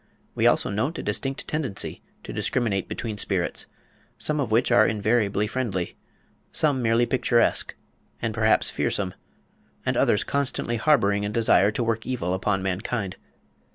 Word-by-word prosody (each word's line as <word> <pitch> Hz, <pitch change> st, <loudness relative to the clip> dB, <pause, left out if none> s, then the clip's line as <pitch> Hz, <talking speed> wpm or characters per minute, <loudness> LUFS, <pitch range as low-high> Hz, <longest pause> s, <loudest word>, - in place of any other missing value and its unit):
We -, -, +2 dB
also -, -, +4 dB
note 130 Hz, +11 st, -1 dB
a -, -, -5 dB
distinct 135 Hz, 0 st, -2 dB
tendency 145 Hz, -10 st, -3 dB, 0.2 s
to -, -, -7 dB
discriminate 105 Hz, -, -1 dB
between 110 Hz, -3 st, -5 dB
spirits, 95 Hz, -4 st, -1 dB, 0.5 s
some 150 Hz, 0 st, -1 dB
of 130 Hz, -6 st, -2 dB
which 120 Hz, +3 st, +2 dB
are 120 Hz, -, +6 dB
invariably 105 Hz, -1 st, +1 dB
friendly, 105 Hz, -6 st, -3 dB, 0.6 s
some 145 Hz, -4 st, +2 dB
merely 115 Hz, +1 st, +3 dB
picturesque, 120 Hz, -2 st, +1 dB, 0.4 s
and 115 Hz, -, -2 dB
perhaps 110 Hz, 0 st, +3 dB
fearsome, 95 Hz, -2 st, -1 dB, 0.7 s
and -, -, 0 dB
others -, -, +2 dB
constantly 135 Hz, -4 st, -1 dB
harbouring 105 Hz, -7 st, +3 dB
a 105 Hz, -, -1 dB
desire 105 Hz, -3 st, +3 dB
to 120 Hz, -, -1 dB
work 115 Hz, 0 st, -2 dB
evil 115 Hz, -9 st, -2 dB
upon 95 Hz, +1 st, 0 dB
mankind. 95 Hz, +1 st, -3 dB
110 Hz, 145 wpm, -25 LUFS, 100-125 Hz, 0.7 s, are